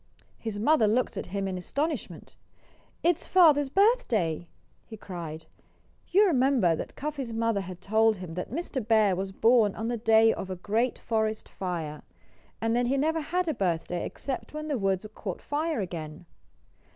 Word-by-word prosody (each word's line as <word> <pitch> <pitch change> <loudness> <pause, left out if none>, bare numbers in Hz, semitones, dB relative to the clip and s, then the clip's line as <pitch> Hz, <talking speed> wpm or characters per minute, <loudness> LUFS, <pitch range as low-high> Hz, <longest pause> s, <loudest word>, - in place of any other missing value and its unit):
His 220 -3 -4
mother 230 +1 +3
looked 240 +4 +1
at - - -5
him 195 0 -2
in 185 -1 -3
astonishment. 300 - -4 0.7
"It's 345 -1 +1
father's 300 -6 +5
birthday!" 255 - +2 0.4
he 220 - -10
cried. 165 -5 -7 0.6
You 400 +4 +5
remember 260 - +3
that - - -7
Cuffy's 280 -5 -4
mother 225 -2 0
had 185 -1 -8
told 220 +1 +3
him 180 -4 -8
that 180 +2 -4
Mr. 280 -2 -3
Bear 215 -4 +4
was 190 +1 -3
born 225 0 +3
on 225 +1 -3
the 240 - -1
day 225 0 +5
of 190 - -6
a 185 - -3
great 220 +7 0
forest 220 -1 -1
fire, 165 -5 -4 0.6
and 225 +1 0
that 245 0 +2
he 270 +3 +1
never 320 +3 +1
had 355 +4 -1
a 315 - +1
birthday 175 - -1
except 275 +2 -5
when 305 0 -5
the 280 -5 0
woods 195 0 0
caught 195 -4 -5
fire 305 -3 -2
again. 165 -2 -6
225 Hz, 165 wpm, -28 LUFS, 190-280 Hz, 0.7 s, father's